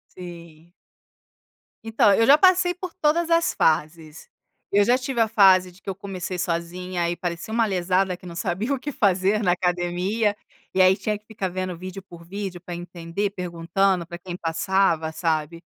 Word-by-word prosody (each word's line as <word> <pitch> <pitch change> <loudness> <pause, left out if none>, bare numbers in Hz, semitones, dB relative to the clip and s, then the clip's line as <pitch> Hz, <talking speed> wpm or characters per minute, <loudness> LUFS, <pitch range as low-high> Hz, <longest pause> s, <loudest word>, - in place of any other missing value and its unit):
Sim. 170 -2 -11 1.1
Então, 220 -2 +3
eu 225 +3 +4
já 285 +4 +7
passei 370 -1 +4
por 360 -1 -7
todas 335 0 +1
as 335 0 +2
fases, 155 0 -1 0.4
eu 205 +1 +4
já 240 +4 +3
tive 255 -2 -2
a 225 - +4
fase 185 -4 +5
de 185 - -21
que - - -7
eu 190 - -3
comecei 185 -2 -5
sozinha 175 0 -2
e 175 - -2
parecia 175 +5 -5
uma 230 -1 +3
lesada 185 -1 0
que - - -17
não 170 -1 -8
sabia 200 +8 -2
o 265 - -2
que 295 - -5
fazer 200 -2 +2
na 180 -4 +3
academia, 180 +4 0 0.4
e 190 - +4
aí 185 +1 +5
tinha 210 -1 -2
que 210 - -26
ficar 210 -3 -4
vendo 185 -1 -4
vídeo 185 +2 -8
por 170 -3 -14
vídeo 190 0 -6
para 175 +1 -7
entender, 175 +3 -4
perguntando 180 0 -1
para 175 +1 -8
quem 175 0 -7
passava, 165 -1 0
sabe, 160 0 -2
185 Hz, 180 wpm, -24 LUFS, 175-205 Hz, 1.1 s, já